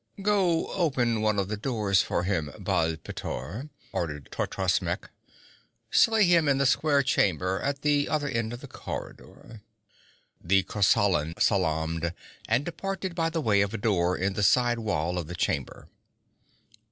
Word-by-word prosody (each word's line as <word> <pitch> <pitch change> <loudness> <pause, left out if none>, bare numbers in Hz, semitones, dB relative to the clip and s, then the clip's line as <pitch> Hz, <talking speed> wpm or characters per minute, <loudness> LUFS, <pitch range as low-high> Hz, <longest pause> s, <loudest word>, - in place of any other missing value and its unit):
'Go 195 -5 +2
open 125 - +1
one 110 -1 +1
of 100 -2 0
the 105 - -2
doors 105 -5 +1
for 85 - -1
him, 85 -6 -1
Baal 80 0 0
pteor,' 90 - -6 0.2
ordered 75 -4 -4
Totrasmek. - - -1 0.8
'Slay 225 -1 +5
him 170 -4 +4
in 135 - +3
the 140 - +2
square 140 +2 +3
chamber 95 - +1
at 140 0 -2
the 145 -1 +2
other 150 -1 0
end 115 -4 -2
of 120 +1 -7
the 140 - -9
corridor.' 115 -3 -9 0.8
The 95 +2 +3
Kosalan 95 -6 +2
salaamed 80 +2 0 0.3
and 140 - +2
departed 190 +2 -4
by 165 -1 0
the 165 -1 -2
way 105 -7 +3
of 100 +2 -1
a - - -1
door 90 -4 +1
in 95 +2 -1
the 105 - -2
side 120 +3 +3
wall 90 -5 -1
of 80 - -5
the 90 - -6
chamber. 70 -5 -2
110 Hz, 155 wpm, -27 LUFS, 90-145 Hz, 0.8 s, Slay